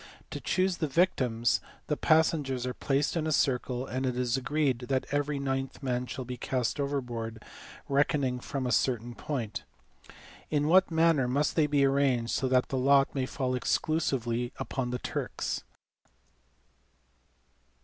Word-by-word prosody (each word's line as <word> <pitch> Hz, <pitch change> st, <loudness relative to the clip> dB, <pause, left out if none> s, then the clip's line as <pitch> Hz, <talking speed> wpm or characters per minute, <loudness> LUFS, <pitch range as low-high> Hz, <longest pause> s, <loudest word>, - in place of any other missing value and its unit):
To -, -, -5 dB
choose 185 Hz, -1 st, +1 dB
the 155 Hz, -, -1 dB
victims, 130 Hz, -7 st, +2 dB, 0.2 s
the 150 Hz, -, 0 dB
passengers 150 Hz, -6 st, +2 dB
are 125 Hz, -, -2 dB
placed 140 Hz, +5 st, 0 dB
in 160 Hz, -2 st, 0 dB
a -, -, 0 dB
circle, 125 Hz, -2 st, +1 dB
and 130 Hz, +1 st, -3 dB
it 125 Hz, -2 st, -1 dB
is 125 Hz, -2 st, +1 dB
agreed 135 Hz, -2 st, 0 dB
that 130 Hz, -1 st, +1 dB
every 145 Hz, 0 st, 0 dB
ninth 135 Hz, 0 st, -3 dB
man 125 Hz, -1 st, -1 dB
shall 130 Hz, -, -5 dB
be 125 Hz, 0 st, -6 dB
cast 125 Hz, +2 st, -1 dB
overboard, 120 Hz, -6 st, -3 dB, 0.4 s
reckoning 140 Hz, -2 st, +1 dB
from 135 Hz, +1 st, -4 dB
a 125 Hz, -, 0 dB
certain 120 Hz, -2 st, +1 dB
point. 120 Hz, -6 st, -4 dB, 0.9 s
In 150 Hz, -1 st, +1 dB
what 185 Hz, +4 st, +5 dB
manner 160 Hz, -5 st, +3 dB
must 140 Hz, +4 st, +1 dB
they 155 Hz, -2 st, +3 dB
be 145 Hz, -1 st, +3 dB
arranged, 135 Hz, -4 st, +2 dB
so 135 Hz, -, +1 dB
that 130 Hz, -1 st, +2 dB
the 135 Hz, -, -1 dB
lot 140 Hz, +1 st, +4 dB
may 130 Hz, -2 st, -1 dB
fall 130 Hz, -2 st, -2 dB
exclusively 125 Hz, -3 st, 0 dB
upon 130 Hz, -2 st, -3 dB
the 125 Hz, -, -2 dB
Turks -, -, -3 dB
135 Hz, 150 wpm, -29 LUFS, 125-145 Hz, 0.9 s, what